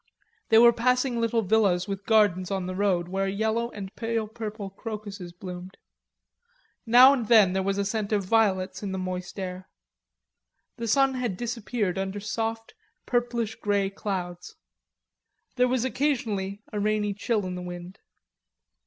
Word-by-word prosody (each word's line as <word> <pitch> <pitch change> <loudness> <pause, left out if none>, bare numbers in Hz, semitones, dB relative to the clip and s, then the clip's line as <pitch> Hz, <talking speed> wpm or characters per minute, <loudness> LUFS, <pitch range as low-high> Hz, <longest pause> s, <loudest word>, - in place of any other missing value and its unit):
They 220 - +6
were 235 +1 +8
passing 250 0 +1
little 230 0 +1
villas 195 -3 +2
with 195 0 -5
gardens 205 -5 +3
on 190 -2 -2
the 185 - -4
road 185 -3 +1
where 195 +2 -1
yellow 220 +4 0
and 200 -4 -8
pale 225 -1 -2
purple 215 -3 -6
crocuses 205 -3 -7
bloomed. 180 +1 -9 1.1
Now 250 +4 +8
and 245 -6 -2
then 210 -5 +6
there 190 - +1
was 195 +1 -1
a 200 - 0
scent 210 0 -2
of 205 -2 +1
violets 190 -2 +1
in 200 -2 -4
the - - -2
moist 185 0 -5
air. 185 0 -6 1.1
The 230 -1 -4
sun 270 +3 +3
had 245 -7 -2
disappeared 230 -4 -2
under 195 +1 -3
soft 225 +2 -3 0.3
purplish 240 -2 -1
grey 200 -2 0
clouds. 180 -3 -5 1.0
There 250 -1 +3
was 255 -1 0
occasionally 220 -7 -1
a 210 - -1
rainy 210 0 0
chill 215 0 -1
in 185 - -4
the 180 - -5
wind. 175 +2 -8
205 Hz, 155 wpm, -26 LUFS, 190-230 Hz, 1.1 s, were